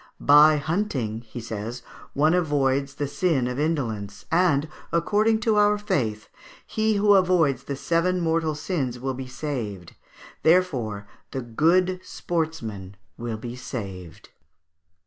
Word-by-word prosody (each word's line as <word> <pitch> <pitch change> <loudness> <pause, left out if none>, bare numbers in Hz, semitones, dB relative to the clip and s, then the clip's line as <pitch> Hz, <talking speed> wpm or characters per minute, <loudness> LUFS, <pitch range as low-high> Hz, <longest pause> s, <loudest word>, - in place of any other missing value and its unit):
"By 150 +1 +7
hunting," 145 - -2
he 120 - -7
says, 115 +1 -6 0.3
"one 155 +3 +3
avoids 140 -5 +1
the 145 - -2
sin 140 -4 0
of 125 +2 -3
indolence; 115 -10 -2
and, 165 -4 +3 0.2
according 210 +6 +2
to 215 -1 +2
our 210 0 +4
faith, 115 - -2 0.4
he 220 0 0
who 205 0 +4
avoids 180 -8 +3
the 140 - -3
seven 170 +5 +1
mortal 160 -2 0
sins 145 -6 -3
will 135 +1 -2
be 130 0 -6
saved; 115 - -5 0.5
therefore 130 - +1 0.2
the 130 - -4
good 175 +10 +2
sportsman 120 - -4 0.2
will 115 -2 -4
be 120 +2 -7
saved." 95 -9 -7
145 Hz, 125 wpm, -25 LUFS, 120-175 Hz, 0.5 s, By